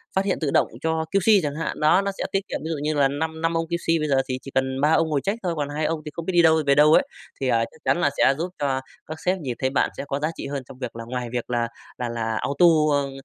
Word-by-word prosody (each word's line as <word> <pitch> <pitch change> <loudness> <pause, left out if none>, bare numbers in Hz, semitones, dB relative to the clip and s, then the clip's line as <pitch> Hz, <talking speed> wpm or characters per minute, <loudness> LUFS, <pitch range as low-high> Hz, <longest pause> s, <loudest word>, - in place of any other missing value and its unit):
phát 190 +1 +2
hiện 190 - 0
tự 145 - 0
động - - +3
cho 160 0 0
QC 200 +2 +4
chẳng 145 -1 -2
hạn. 165 - -3
Đó, 155 +5 +4
nó 200 0 -2
sẽ - - -3
tiết 195 +1 -1
kiệm, - - -3
ví 160 - -4
dụ 160 - -2
như 150 +1 0
là 145 -2 +3
năm 160 +3 -3
năm 165 0 +1
ông 165 - -1
QC, 165 -1 0
bây 155 - 0
giờ 135 -2 +3
thì 130 -1 -3
chỉ 135 - -10
cần 130 0 0
3 150 +2 +3
ông 160 0 +2
ngồi 145 -3 0
check 205 +4 -1
thôi, 175 -2 0
còn 145 -1 -2
2 150 +1 -2
ông 160 -1 -1
thì 150 - -6
không 170 - -6
biết 190 - -2
đi 175 - +6
đâu 160 -1 +5
về 140 - +5
đâu 150 +1 +6
ấy. 275 - +6 0.4
Thì, 135 - -1
à, 115 -2 +2
chắc - - -18
chắn - - +3
là - - +3
sẽ 135 - +5
giúp 170 +3 -2
cho 135 -2 0 0.3
các 155 +1 -7
sếp 185 +1 +2
nhìn 130 -7 -4
thấy 130 - +1
bạn 135 - +1
sẽ - - -4
có 140 0 -2
giá 155 - 0
trị - - -6
hơn 140 -2 -4
trong 125 - -13
việc 125 -4 -5
là 115 - -6
ngoài 125 0 -4
việc 120 -1 -3
là 120 -1 0 0.3
là 125 -1 -3
là 115 -1 -2
auto 140 +5 +2 0.3
ơ, 140 -1 +1
150 Hz, 315 wpm, -24 LUFS, 135-165 Hz, 0.4 s, đi